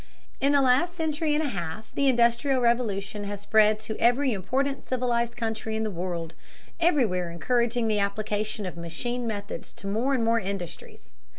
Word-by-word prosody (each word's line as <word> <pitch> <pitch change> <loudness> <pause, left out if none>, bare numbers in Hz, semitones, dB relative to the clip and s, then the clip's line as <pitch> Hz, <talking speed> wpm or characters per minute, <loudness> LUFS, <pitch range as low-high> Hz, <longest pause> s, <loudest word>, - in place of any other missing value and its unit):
In 280 +1 +3
the 280 -1 +5
last 270 +8 +3
century 310 -2 0
and 310 - +1
a 290 - -1
half 175 +1 -5
the 280 - +2
Industrial 240 +2 +3
Revolution 210 -4 0
has 200 0 -5
spread 215 0 +4
to 220 0 -4
every 245 +2 +3
important 270 +8 -1
civilized 240 -2 0
country 220 -1 -2
in 220 - -1
the 215 - -2
world, 170 -2 -4 0.5
everywhere 235 - +2
encouraging 235 +6 0
the 215 -1 +1
application 210 +1 -1
of 180 - -5
machine 235 +9 -3
methods 205 -2 -5
to - - -11
more 230 +8 +1
and 240 - 0
more 230 0 +3
industries. 185 - -7
225 Hz, 170 wpm, -27 LUFS, 200-255 Hz, 0.5 s, the